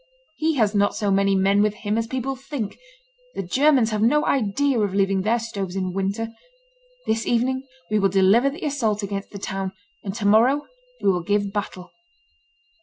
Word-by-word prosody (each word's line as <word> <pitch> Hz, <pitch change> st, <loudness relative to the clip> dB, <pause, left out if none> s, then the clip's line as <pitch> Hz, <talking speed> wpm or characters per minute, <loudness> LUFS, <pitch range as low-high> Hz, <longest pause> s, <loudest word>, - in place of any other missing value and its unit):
He 315 Hz, 0 st, 0 dB
has 220 Hz, -5 st, +2 dB
not 205 Hz, 0 st, +2 dB
so 205 Hz, -2 st, 0 dB
many 195 Hz, 0 st, +3 dB
men 195 Hz, +1 st, +3 dB
with 210 Hz, 0 st, +1 dB
him 210 Hz, 0 st, -2 dB
as 225 Hz, 0 st, -1 dB
people 260 Hz, +2 st, -3 dB
think; 265 Hz, -5 st, -6 dB, 0.6 s
the -, -, -3 dB
Germans 260 Hz, -, +3 dB
have 210 Hz, -1 st, -1 dB
no 295 Hz, +7 st, +3 dB
idea 270 Hz, +2 st, +1 dB
of 200 Hz, -2 st, 0 dB
leaving 195 Hz, -1 st, +2 dB
their 220 Hz, +5 st, +2 dB
stoves 200 Hz, -5 st, -5 dB
in 185 Hz, -2 st, -2 dB
winter. 200 Hz, +4 st, -2 dB, 0.8 s
This 225 Hz, 0 st, -1 dB
evening 260 Hz, +3 st, 0 dB, 0.2 s
we 215 Hz, -, +3 dB
will 195 Hz, -1 st, +3 dB
deliver 195 Hz, +8 st, +4 dB
the 305 Hz, +4 st, -7 dB
assault 225 Hz, -8 st, -1 dB
against 200 Hz, 0 st, -4 dB
the 200 Hz, -, -8 dB
town, 195 Hz, -1 st, -4 dB, 0.3 s
and 195 Hz, -1 st, -5 dB
to 220 Hz, -3 st, -4 dB
morrow 240 Hz, +8 st, +4 dB, 0.4 s
we 195 Hz, -, +5 dB
will 180 Hz, -1 st, -1 dB
give 205 Hz, +2 st, 0 dB
battle." 185 Hz, -3 st, -5 dB
210 Hz, 185 wpm, -23 LUFS, 195-245 Hz, 0.8 s, we